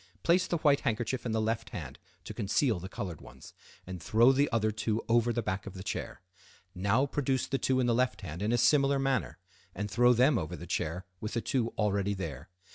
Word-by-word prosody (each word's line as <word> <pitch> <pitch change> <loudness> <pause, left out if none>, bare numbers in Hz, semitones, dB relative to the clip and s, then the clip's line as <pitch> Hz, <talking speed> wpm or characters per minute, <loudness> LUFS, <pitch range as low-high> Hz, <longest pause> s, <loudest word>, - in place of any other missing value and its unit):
Place 175 +2 +3
the 170 - 0
white 145 -3 +3
handkerchief 120 +2 -2
in - - -2
the 110 - +1
left 115 +1 -1
hand - - -7 0.2
to - - -7
conceal 105 +1 +1
the 95 +2 -7
colored 90 -5 -6
ones, - - -13 0.3
and 90 -2 -7
throw 115 +8 +5
the 140 +2 +2
other 110 -1 +1
two 110 +1 -2
over 120 +1 +3
the 120 0 -2
back 100 -1 -3
of 100 - -8
the 95 - -7
chair. 95 - -5 0.5
Now 100 +8 +2
produce 135 -2 -1
the 135 - -2
two 130 -1 +1
in 125 - +2
the 120 - +2
left 125 +1 0
hand 85 -2 -7
in 105 +2 0
a 120 - +3
similar 140 +3 +4
manner, 135 -1 -1 0.4
and 105 +1 -4
throw 120 +3 +5
them 125 +1 +4
over 80 -4 -4
the - - -9
chair 85 +4 -3
with 110 - -5
the 115 - 0
two 120 -2 0
already 100 -1 0
there. 80 -4 -6
115 Hz, 220 wpm, -30 LUFS, 100-130 Hz, 0.5 s, throw